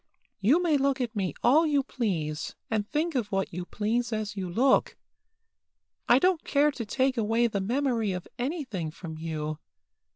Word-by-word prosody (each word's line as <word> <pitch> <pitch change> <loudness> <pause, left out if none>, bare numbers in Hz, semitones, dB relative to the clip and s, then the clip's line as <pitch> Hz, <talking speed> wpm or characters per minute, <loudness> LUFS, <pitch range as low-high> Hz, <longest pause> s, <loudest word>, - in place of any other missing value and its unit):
You 240 - +4
may 315 -4 +3
look 275 -1 +1
at 240 -3 -2
me 190 -7 -1
all 305 +7 +5
you 285 -2 +2
please, 165 - -3 0.2
and 215 -1 -1
think 320 +3 0
of 235 -6 -1
what 195 -2 -1
you 175 +1 -4
please 230 +3 -1
as 215 -2 -3
you 190 -3 -4
look. 250 +10 +2 1.1
I 240 - +8
don't 360 +3 +2
care 295 +1 +3
to 245 -5 -5
take 260 +3 +1
away 225 +2 +2
the 210 -4 0
memory 235 -1 0
of 180 -1 -5
anything 250 - -3
from 160 0 -8
you. 155 -1 -4
230 Hz, 170 wpm, -28 LUFS, 190-275 Hz, 1.1 s, I